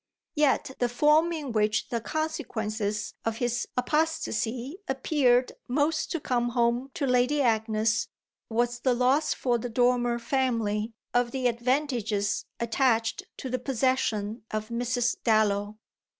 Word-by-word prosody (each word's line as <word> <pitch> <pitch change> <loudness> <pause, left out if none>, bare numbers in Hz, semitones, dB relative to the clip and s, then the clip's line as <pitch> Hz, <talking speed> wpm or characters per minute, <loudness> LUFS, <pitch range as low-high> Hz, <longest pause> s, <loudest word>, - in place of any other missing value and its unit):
Yet 295 -3 +2
the 245 - +1
form 300 +7 +4
in 300 -6 -4
which 215 -1 +1
the 235 -1 -2
consequences 220 -9 -3
of 225 0 -2
his 245 0 -1
apostasy 265 - -1
appeared 260 -2 +2 0.2
most 295 +5 0
to 335 - -2
come 240 -3 0
home 240 +2 +1
to 285 - -1
Lady 250 +3 +2
Agnes 220 -2 +1 0.4
was 240 +1 0
the 255 0 +2
loss 260 +5 +2
for 245 -2 0
the 245 - -4
Dormer 245 0 +2
family 230 -4 0 0.2
of 245 0 +2
the 260 +1 -3
advantages 235 -4 0
attached 230 -1 +1
to - - -5
the 255 0 -2
possession 235 -4 0
of 215 +1 -3
Mrs. 245 +1 0
Dallow. 210 -2 +2
245 Hz, 130 wpm, -27 LUFS, 225-265 Hz, 0.4 s, form